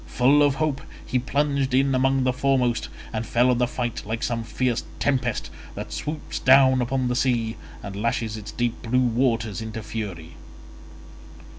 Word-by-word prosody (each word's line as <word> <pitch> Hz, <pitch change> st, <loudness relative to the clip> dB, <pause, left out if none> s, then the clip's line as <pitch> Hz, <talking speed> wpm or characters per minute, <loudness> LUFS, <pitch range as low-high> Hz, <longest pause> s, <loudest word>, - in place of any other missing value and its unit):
Full 135 Hz, +4 st, +4 dB
of 145 Hz, -2 st, +4 dB
hope 150 Hz, -2 st, -1 dB, 0.2 s
he 125 Hz, -, 0 dB
plunged 140 Hz, 0 st, 0 dB
in 135 Hz, +1 st, +3 dB
among 135 Hz, +1 st, +2 dB
the 130 Hz, 0 st, +2 dB
foremost, 130 Hz, -2 st, +1 dB, 0.2 s
and 110 Hz, 0 st, -1 dB
fell 120 Hz, +2 st, +3 dB
on 120 Hz, -, +1 dB
the 125 Hz, -, +3 dB
fight 120 Hz, -1 st, -3 dB
like 115 Hz, +2 st, -4 dB
some 115 Hz, -1 st, -1 dB
fierce 125 Hz, +1 st, -1 dB
tempest 130 Hz, -4 st, -1 dB, 0.2 s
that -, -, -6 dB
swoops 150 Hz, +1 st, -4 dB
down 130 Hz, -1 st, +6 dB
upon 130 Hz, +1 st, 0 dB
the 125 Hz, -, 0 dB
sea, 120 Hz, -3 st, +1 dB, 0.3 s
and 100 Hz, -1 st, -6 dB
lashes 110 Hz, +1 st, -1 dB
its 105 Hz, -1 st, -7 dB
deep 120 Hz, -1 st, -2 dB
blue 125 Hz, +2 st, +1 dB
waters 115 Hz, -3 st, 0 dB
into 110 Hz, 0 st, -6 dB
fury. 100 Hz, -7 st, -6 dB
125 Hz, 165 wpm, -24 LUFS, 115-135 Hz, 0.3 s, down